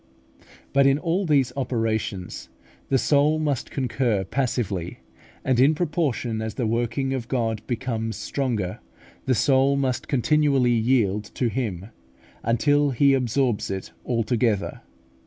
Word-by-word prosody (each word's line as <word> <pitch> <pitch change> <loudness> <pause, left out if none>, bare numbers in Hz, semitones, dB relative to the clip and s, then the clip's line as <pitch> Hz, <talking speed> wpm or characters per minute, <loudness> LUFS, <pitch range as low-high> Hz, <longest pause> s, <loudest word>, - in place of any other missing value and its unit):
But 140 0 +5
in 135 0 +4
all 175 +4 -1
these 135 -5 +2
operations 110 -7 -2 0.4
the 135 - +3
soul 145 +3 +3
must 145 -4 -1
concur 120 -5 0
passively, 100 -6 -2 0.5
and 130 -2 +2
in 140 +5 +5
proportion 145 -9 -1
as 110 -2 -4
the 120 - -1
working 120 +4 -1
of 125 -3 -4
God 115 -4 -1
becomes 115 -3 -2
stronger, 110 -4 -2 0.5
the 130 - +3
soul 135 +4 +3
must 130 -2 -1
continually 140 -1 +2
yield 110 -3 +2
to 125 - +1
Him, 105 -6 -3 0.5
until 145 +6 +2
He 140 +2 +3
absorbs 125 -2 0
it 95 -1 -5
altogether. 115 -3 0
125 Hz, 125 wpm, -24 LUFS, 110-140 Hz, 0.5 s, But